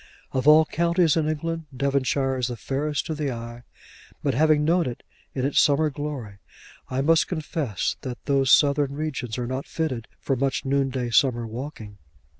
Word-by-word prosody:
Of 130 +1 0
all 155 +1 +8
counties 170 0 +2
in 155 -2 +1
England 165 +1 -3
Devonshire 135 0 +1
is 125 -2 0
the 120 -2 -5
fairest 145 +4 -2
to 160 - -3
the 150 -3 -2
eye; 120 0 -7 0.6
but, 140 - +1
having 150 +2 +3
known 170 -1 +2
it 120 - -6 0.3
in 130 -1 -1
its 140 - +2
summer 150 +1 +3
glory, 135 -9 -6 0.5
I 130 +1 -1
must 160 +3 +3
confess 155 - -2
that 125 -2 -5
those 135 -2 +2
southern 140 -1 +4
regions 135 -7 -4
are 125 - -2
not 130 +3 -4
fitted 130 -8 -3
for 135 - -1
much 135 +1 -1
noonday 135 -3 0
summer 120 -1 +3
walking. 110 -3 -8
140 Hz, 170 wpm, -24 LUFS, 125-155 Hz, 0.6 s, all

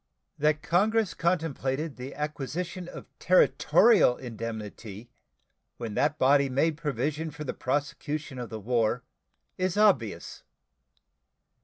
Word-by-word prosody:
That 150 +1 +2
Congress 210 +3 +2
contemplated 160 -4 -1
the 130 +2 -8
acquisition 155 +5 -4
of - - -9
territorial 230 - +4
indemnity 115 -2 -7 0.7
when 115 -3 -5
that 150 +7 +1
body 140 +1 +4
made 150 +5 +1
provision 150 +1 -2
for 150 - -8
the 150 - -4
prosecution 145 0 -3
of 120 - -5
the 110 - -6
war 115 +2 0 0.6
is 185 +1 0
obvious. 120 - +1
145 Hz, 110 wpm, -28 LUFS, 125-165 Hz, 0.7 s, territorial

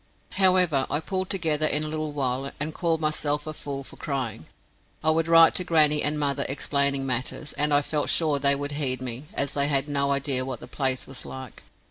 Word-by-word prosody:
However, 180 -7 +3
I 145 - 0
pulled 185 +3 -3
together 155 -5 0
in 150 0 0
a - - -2
little 155 0 -3
while, 135 -1 -2
and 155 +2 -2
called 165 -2 0
myself 150 -1 0
a 155 - -5
fool 140 -2 -6
for - - -11
crying. 125 - -4 0.6
I 155 - +4
would 160 +1 +1
write 165 0 +7
to 180 - -1
grannie 150 -3 +3
and 150 +1 0
mother 140 -1 0
explaining 140 0 0
matters, 130 +4 -2
and 150 +1 +1
I 145 0 +4
felt 150 0 -2
sure 155 -4 +2
they 140 0 +3
would 145 +1 -4
heed 135 -4 -1
me, 130 +2 -5
as 140 0 +1
they 140 0 +2
had 140 -1 +1
no 140 -1 0
idea 140 -2 0
what 130 -3 -5
the - - -11
place 130 -2 -1
was 135 -1 -3
like. 130 -2 -9
145 Hz, 210 wpm, -25 LUFS, 135-155 Hz, 0.6 s, write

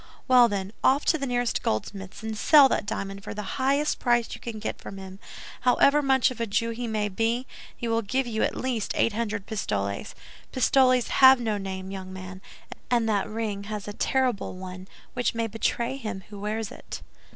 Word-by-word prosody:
"Well, 250 -2 +7
then, 200 0 -3
off 275 +3 +3
to 320 - +3
the 275 - -2
nearest 245 -1 0
goldsmith's, 195 - -4
and 220 0 -3
sell 285 +6 +7
that 205 - -1
diamond 195 -1 -4
for - - -6
the 210 +6 -5
highest 280 +3 +1
price 240 -2 +1
you - - -7
can 230 -2 -6
get 215 - -5
from 195 - -8
him. 190 0 -9 0.4
However 280 +4 +4
much 265 -2 +3
of 235 - -7
a 230 - 0
Jew 230 +3 0
he 235 +1 -4
may 215 -2 0
be, 225 +5 -1 0.3
he 235 - -4
will 230 0 +1
give 255 +6 -1
you 220 -2 -2
at - - +1
least 245 -5 -2
eight 230 - +2
hundred 220 -2 -2
pistoles. 100 - -3 0.4
Pistoles 255 0 +3
have 265 -1 +7
no 220 -3 -1
name, 190 -1 -5
young 190 -1 -7
man, 185 0 -8 0.5
and 235 -2 +2
that 205 -3 0
ring 210 -2 -3
has 210 -1 -5
a 205 - -5
terrible 250 -4 0
one, 185 0 -8 0.3
which 245 -1 -1
may 230 0 0
betray 235 +3 -1
him 215 -7 -5
who 205 -1 -9
wears 215 +1 -3
it." - - -9
225 Hz, 195 wpm, -26 LUFS, 200-245 Hz, 0.5 s, Well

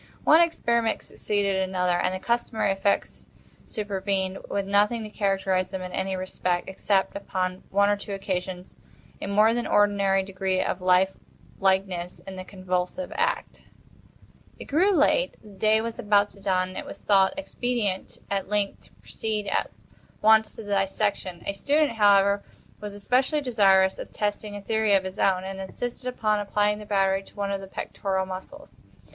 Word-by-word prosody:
One 320 +2 +7
experiment 235 -9 +1
succeeded 200 -2 -1
another, 185 -2 0
and 185 - +1
the 185 - -3
customary 230 -1 0
effects 195 +1 -1 0.4
supervened, 195 -2 -2
with 200 -1 -1
nothing 210 +3 +2
to 215 - -8
characterize 195 -3 0
them 190 -1 -5
in 180 - -6
any 190 +1 -2
respect, 185 -1 -2
except, 190 0 0
upon 185 -2 -3
one 200 +1 +3
or 205 - +3
two 200 0 -7
occasions, 185 -1 -4 0.5
a - - -4
more 210 +3 +4
than 240 0 -2
ordinary 200 -2 +3
degree 190 -1 -1
of 185 - -1
life 185 +1 +4 0.5
likeness 190 -2 0
in 195 - -10
the 185 - -6
convulsive 185 +7 -3
action. - - -2 0.9
It - - -9
grew 340 +8 +3
late. 385 - +2
The 215 - -16
day 215 +2 +2
was 230 0 -5
about 205 -1 +3
to 200 - -14
dawn; 185 -1 +1
and 185 - -9
it - - -7
was - - -10
thought 195 +5 +3
expedient, 240 -8 -2
at 195 -1 -1
length, 205 -1 0
to - - -22
proceed 215 -2 -3
at - - 0 0.5
once 220 0 +4
to 225 - -8
the 205 - -7
dissection. 195 -2 -1
A 200 - -1
student, 290 +7 +2
however, 200 -2 +4 0.4
was 205 -1 -7
especially 255 +8 +1
desirous 195 -7 +3
of - - -6
testing 205 0 -3
a 205 - -6
theory 220 -1 +2
of 190 - +2
his 190 +2 -7
own, 185 -1 +2
and 195 0 -6
insisted 245 +6 -5
upon 215 -4 0
applying 210 +1 +1
the 210 - -10
battery 195 -1 +2
to 195 - -19
one 200 -1 -2
of 195 0 -2
the 195 - -9
pectoral 190 0 -3
muscles. 190 +10 -9
200 Hz, 170 wpm, -26 LUFS, 190-215 Hz, 0.9 s, One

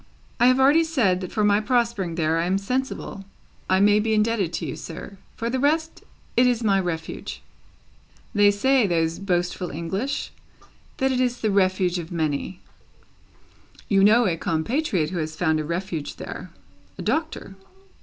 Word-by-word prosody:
"I 245 - +6
have 255 +1 +4
already 285 +5 +5
said, 235 - +1
that 185 - -6
for 215 - 0
my 205 0 +4
prospering 215 -7 0
there, 165 0 +1
I 165 - 0
am 190 +2 +2
sensible 250 -1 -3 0.5
I 185 0 +4
may 205 +1 +5
be 220 +1 +1
indebted 210 -5 +1
to - - -3
you, - - -4
sir. 185 +4 -9 0.2
For 230 - -3
the 260 +2 -1
rest, 315 +4 0 0.3
it 245 +1 +5
is 240 -1 +1
my 200 -3 +3
Refuge." 165 -3 -5 0.9
"They 205 -1 +5
say, 245 +3 +3
those 165 -2 0
boastful 180 -2 -1
English, 190 - -3 0.7
that 265 0 +1
it 255 - 0
is 245 -1 -1
the 215 - +1
Refuge 185 -2 +2
of 170 0 -8
many. 160 +2 -2 1.3
You 195 -1 +4
know 225 +4 +6
a 170 -4 0
compatriot 170 - -1
who 180 - -2
has 155 0 -4
found 160 -2 +1
a - - -2
Refuge 170 -1 -4
there? - - -8 0.5
A - - -6
Doctor?" 315 -10 -2
195 Hz, 165 wpm, -24 LUFS, 175-240 Hz, 1.3 s, I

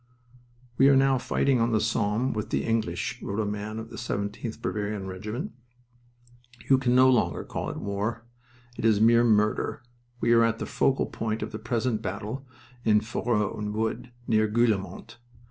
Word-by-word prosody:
"We 135 +1 +7
are 140 - +6
now 135 -1 +4
fighting 130 -1 +1
on 115 0 +1
the 110 - +3
Somme 115 +3 0
with 105 -1 -4
the - - 0
English," 110 -7 -2
wrote 100 +2 -3
a 110 - +1
man 105 +1 -4
of 110 0 -7
the - - -8
17th 105 -1 -4
Bavarian 105 -1 -3
Regiment. 105 - -5 1.2
"You 135 -1 +5
can 125 -2 +2
no 130 +1 +7
longer 130 -2 +2
call - - -4
it - - -6
war. 105 +3 -3 0.5
It - - -3
is 110 -2 +4
mere 115 +2 +5
murder. 110 +1 +1 0.4
We 120 - +1
are 115 0 +6
at 115 0 +1
the - - -4
focal 135 - +1
point 110 0 -3
of - - -5
the 110 - -6
present 115 0 -1
battle 110 +6 -5 0.4
in 105 -1 +4
Foureaux 110 -2 -1
Wood 110 +4 -2
(near 110 -1 +2
Guillemont). 110 -3 -1
110 Hz, 170 wpm, -27 LUFS, 105-120 Hz, 1.2 s, We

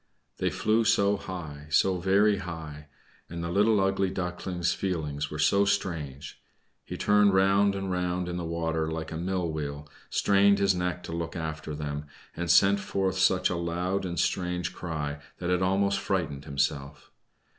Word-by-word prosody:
They - - 0
flew 110 +2 +1
so 100 -2 +3
high, 80 -7 -7
so 90 +5 +3
very 100 +3 +3
high! 80 -5 -7 0.4
And 85 0 -5
the 85 - -3
little 105 +3 +3
Ugly 95 0 +1
Duckling's 90 -1 -2
feelings 75 -6 -3
were 75 - -6
so 90 +7 +4
strange. 75 -8 -3 0.4
He - - -7
turned 105 -1 +4
round 100 +1 +4
and 95 -1 -3
round 90 0 -1
in 90 - -3
the 90 - -3
water 80 -1 -1
like 80 0 -4
a - - -4
mill 90 -1 -1
wheel, 75 -1 -5 0.2
strained 100 0 +4
his 100 -1 +3
neck 90 0 -2
to - - -7
look 85 +1 -4
after 80 -2 -4
them, 75 0 -4 0.3
and 85 0 -3
sent 100 +3 +5
forth 95 -1 -1
such - - +3
a - - -1
loud 90 +3 -1
and 85 -2 -3
strange 90 -1 -1
cry 75 -4 -4 0.2
that 90 0 -2
it 90 0 +2
almost 95 +1 +2
frightened 80 -9 -2
himself. 70 0 -2
90 Hz, 165 wpm, -28 LUFS, 80-95 Hz, 0.4 s, sent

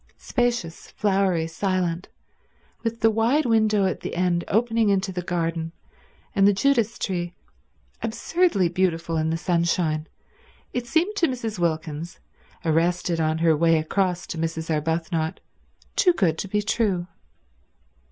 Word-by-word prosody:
Spacious, 240 -9 -2
flowery, 190 -5 +1
silent, 180 0 -1 0.7
with 230 0 -3
the 225 -1 +5
wide 235 +8 +2
window 215 -3 +3
at 185 - -1
the - - -5
end 175 -1 +1
opening 225 0 +2
into 195 -1 +1
the 180 -1 -3
garden, 165 -2 -2 0.6
and 195 -2 +5
the 205 - +5
Judas 235 0 +2
tree 175 -2 -3 0.7
absurdly 230 - +1
beautiful 170 -2 0
in 160 0 +1
the 165 - 0
sunshine, 170 -2 0 0.7
it 245 -1 -3
seemed 340 - +1
to 335 - +3
Mrs. 230 -7 -4
Wilkins, 160 -1 -2 0.5
arrested 170 +1 +1
on 155 0 +1
her 160 -1 +5
way 165 +1 +4
across 180 +3 0
to 165 - -6
Mrs. 165 0 -2
Arbuthnot, 160 +2 -1 0.6
too 360 -2 +5
good 165 - +1
to - - -3
be 210 +2 0
true. 200 -4 0
180 Hz, 135 wpm, -24 LUFS, 165-220 Hz, 0.7 s, the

